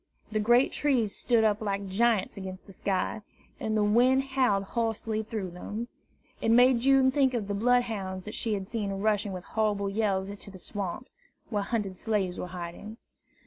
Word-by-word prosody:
The 215 Hz, -, 0 dB
great 240 Hz, +5 st, +4 dB
trees 245 Hz, -8 st, +1 dB
stood 235 Hz, -2 st, +2 dB
up 215 Hz, -1 st, +2 dB
like 200 Hz, -2 st, -2 dB
giants 215 Hz, +1 st, +1 dB
against 190 Hz, -1 st, -7 dB
the 195 Hz, -, -13 dB
sky, 190 Hz, +2 st, -1 dB, 0.4 s
and 220 Hz, 0 st, -1 dB
the 210 Hz, -, +3 dB
wind 250 Hz, +6 st, +4 dB
howled 255 Hz, -7 st, +1 dB
hoarsely 225 Hz, 0 st, -1 dB
through 215 Hz, -4 st, -4 dB
them. 210 Hz, +7 st, -6 dB, 0.5 s
It -, -, +1 dB
made 245 Hz, +1 st, +6 dB
June 265 Hz, +1 st, +4 dB
think 265 Hz, -2 st, +2 dB
of 215 Hz, -4 st, -2 dB
the 205 Hz, -, -2 dB
bloodhounds 210 Hz, -4 st, 0 dB
that 210 Hz, -, -6 dB
she 220 Hz, -2 st, -1 dB
had 195 Hz, -1 st, -5 dB
seen 215 Hz, -2 st, -2 dB
rushing 205 Hz, +1 st, 0 dB
with 180 Hz, -1 st, -6 dB
horrible 205 Hz, -1 st, 0 dB
yells 200 Hz, -2 st, 0 dB
to 200 Hz, -, -9 dB
the 190 Hz, -, -11 dB
swamps, 200 Hz, -, -6 dB, 0.3 s
where 205 Hz, -2 st, +1 dB
hunted 200 Hz, -3 st, -2 dB
slaves 195 Hz, -5 st, -1 dB
were -, -, -4 dB
hiding. 180 Hz, +5 st, -7 dB
210 Hz, 180 wpm, -28 LUFS, 195-235 Hz, 0.5 s, made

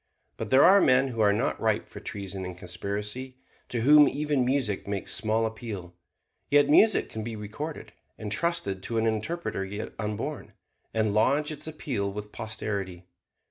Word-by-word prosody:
But -, -, -5 dB
there 130 Hz, +2 st, +6 dB
are 195 Hz, +3 st, +7 dB
men 130 Hz, +1 st, +4 dB
who 115 Hz, -3 st, -2 dB
are 105 Hz, -1 st, +5 dB
not 100 Hz, -, -1 dB
ripe -, -, +1 dB
for -, -, -10 dB
treason 100 Hz, -1 st, -6 dB
and 90 Hz, -1 st, -6 dB
conspiracy, 105 Hz, +8 st, -5 dB, 0.3 s
to 120 Hz, -, -1 dB
whom 150 Hz, +4 st, +7 dB
even 145 Hz, -2 st, 0 dB
music 125 Hz, -7 st, 0 dB
makes 100 Hz, -1 st, -2 dB
small 110 Hz, +1 st, +1 dB
appeal. 110 Hz, -6 st, -6 dB, 0.6 s
Yet 145 Hz, 0 st, +4 dB
music 215 Hz, +7 st, +5 dB
can 110 Hz, -, -6 dB
be 115 Hz, 0 st, -5 dB
recorded, 110 Hz, +10 st, -6 dB, 0.2 s
entrusted 105 Hz, -, -1 dB
to 115 Hz, +4 st, -2 dB
an 110 Hz, -, +2 dB
interpreter 110 Hz, -, -1 dB
yet 105 Hz, +2 st, -6 dB
unborn, 105 Hz, -1 st, -4 dB, 0.4 s
and 110 Hz, -2 st, +1 dB
lodge 140 Hz, +8 st, +2 dB
its 155 Hz, +1 st, -7 dB
appeal 125 Hz, -10 st, -3 dB
with 105 Hz, +1 st, -7 dB
posterity. 100 Hz, -5 st, -4 dB
110 Hz, 160 wpm, -27 LUFS, 100-140 Hz, 0.6 s, are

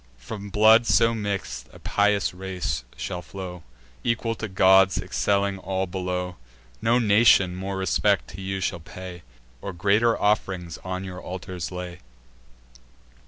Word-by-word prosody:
From 100 Hz, -, -7 dB
blood 110 Hz, +3 st, +6 dB
so 115 Hz, 0 st, +4 dB
mix'd, 100 Hz, -, -4 dB
a -, -, -14 dB
pious 100 Hz, -2 st, +1 dB
race 90 Hz, -9 st, -3 dB
shall 90 Hz, -, -4 dB
flow, 90 Hz, +1 st, -8 dB, 0.4 s
Equal 115 Hz, -1 st, 0 dB
to 110 Hz, -1 st, -5 dB
gods, 95 Hz, 0 st, +5 dB
excelling 100 Hz, -1 st, 0 dB
all 95 Hz, 0 st, -2 dB
below. 90 Hz, -1 st, -3 dB, 0.4 s
No 115 Hz, +2 st, +3 dB
nation 105 Hz, -5 st, +5 dB
more 95 Hz, +1 st, -4 dB
respect 100 Hz, +1 st, +1 dB
to 95 Hz, -, -9 dB
you 95 Hz, 0 st, -3 dB
shall 90 Hz, -2 st, -1 dB
pay, 90 Hz, +2 st, -9 dB, 0.4 s
Or -, -, -5 dB
greater 105 Hz, +6 st, +2 dB
off'rings 95 Hz, -5 st, 0 dB
on 95 Hz, 0 st, -4 dB
your 90 Hz, -1 st, -7 dB
altars 90 Hz, -1 st, -6 dB
lay." 90 Hz, -1 st, -6 dB
95 Hz, 135 wpm, -25 LUFS, 90-100 Hz, 0.4 s, blood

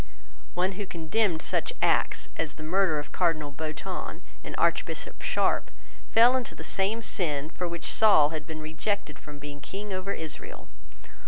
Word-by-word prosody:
One 185 Hz, +2 st, +2 dB
who 200 Hz, +1 st, -5 dB
condemned 170 Hz, +1 st, 0 dB
such -, -, 0 dB
acts -, -, +2 dB
as 160 Hz, -2 st, -2 dB
the 155 Hz, -, -9 dB
murder 175 Hz, 0 st, +2 dB
of 145 Hz, -, -5 dB
Cardinal 160 Hz, -5 st, +1 dB
Beatoun 155 Hz, +2 st, -5 dB, 0.2 s
and -, -, -6 dB
Archbishop -, -, 0 dB
Sharpe -, -, +1 dB, 0.4 s
fell 240 Hz, +3 st, +7 dB
into 255 Hz, -3 st, -2 dB
the -, -, -8 dB
same 210 Hz, +4 st, 0 dB
sin 155 Hz, -6 st, -1 dB
for 180 Hz, -, -3 dB
which 170 Hz, 0 st, -4 dB
Saul 200 Hz, -9 st, +6 dB
had 155 Hz, -1 st, -5 dB
been 160 Hz, -1 st, -6 dB
rejected 155 Hz, 0 st, -2 dB
from 150 Hz, -1 st, -10 dB
being 145 Hz, 0 st, -8 dB
King 195 Hz, +7 st, -5 dB
over 185 Hz, +1 st, -2 dB
Israel. 160 Hz, -5 st, -5 dB
165 Hz, 160 wpm, -28 LUFS, 155-195 Hz, 0.4 s, fell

